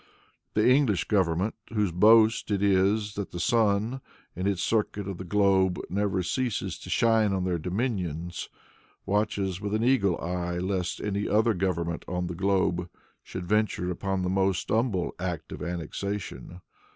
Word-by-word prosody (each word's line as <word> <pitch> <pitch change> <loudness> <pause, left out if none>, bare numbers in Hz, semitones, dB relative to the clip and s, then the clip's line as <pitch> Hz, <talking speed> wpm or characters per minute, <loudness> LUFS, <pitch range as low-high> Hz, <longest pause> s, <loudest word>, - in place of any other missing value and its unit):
The 105 - +3
English 125 - +4
government, 95 0 +1 0.2
whose 105 -4 +1
boast 110 +6 +5
it 100 -1 0
is 100 +2 +2
that 100 -2 -4
the 90 - -6
sun, 110 +4 +1 0.3
in 90 +2 -2
its 100 -3 0
circuit 105 -3 0
of 95 -3 -5
the - - -4
globe, 95 -1 +2
never 100 -1 0
ceases 120 +5 -2
to - - -10
shine 115 -3 +3
on 95 -1 0
their 90 -2 -1
domains, 90 - -3 0.6
watches 100 -2 -1
with 105 0 -2
an 110 - 0
eagle 110 -8 +2
eye 90 0 -3
lest 90 -1 -2
any 100 0 -2
other 110 +2 +3
government 85 -3 -2
on 90 0 -2
the 90 - -4
globe 90 -1 0 0.3
should 95 -1 -7
venture 105 -3 0
upon 95 +1 -2
the - - 0
most 95 -1 0
humble 110 -6 0
act 90 -3 -4
of - - -7
annexation. 90 +1 -5
95 Hz, 155 wpm, -27 LUFS, 90-105 Hz, 0.6 s, boast